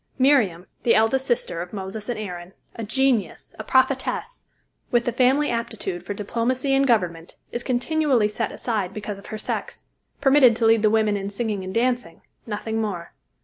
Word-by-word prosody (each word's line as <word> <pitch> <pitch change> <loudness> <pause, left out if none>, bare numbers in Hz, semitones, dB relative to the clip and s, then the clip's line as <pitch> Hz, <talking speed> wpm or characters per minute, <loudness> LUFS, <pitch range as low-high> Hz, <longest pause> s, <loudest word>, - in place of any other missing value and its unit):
Miriam, 245 -11 +3 0.2
the 235 - +3
eldest 260 +5 +2
sister 230 -8 0
of 175 +3 -8
Moses 205 +3 -5
and 240 - -2
Aaron, 180 -3 -7 0.2
a 230 - -5
genius, 225 -4 0
a - - -4
prophetess, 260 - 0 0.4
with 240 -1 +2
the 240 - +1
family 260 +5 +3
aptitude 225 -6 -3
for 205 - -5
diplomacy 245 +6 -1
and 275 0 +3
government, 175 -8 0
is 240 - -3
continually 255 -2 +1
set 215 +2 -3
aside 205 -6 -3
because 210 -1 -5
of 200 - -14
her 215 - -5
sex 215 - -4 0.4
permitted 270 -4 +6
to 230 - 0
lead 225 -1 +5
the 215 - +4
women 215 -1 +2
in 200 0 -3
singing 205 -2 -3
and 185 +2 -6
dancing, 245 -6 0 0.3
nothing 220 +1 -2
more. 180 -6 -4
225 Hz, 175 wpm, -23 LUFS, 200-255 Hz, 0.4 s, permitted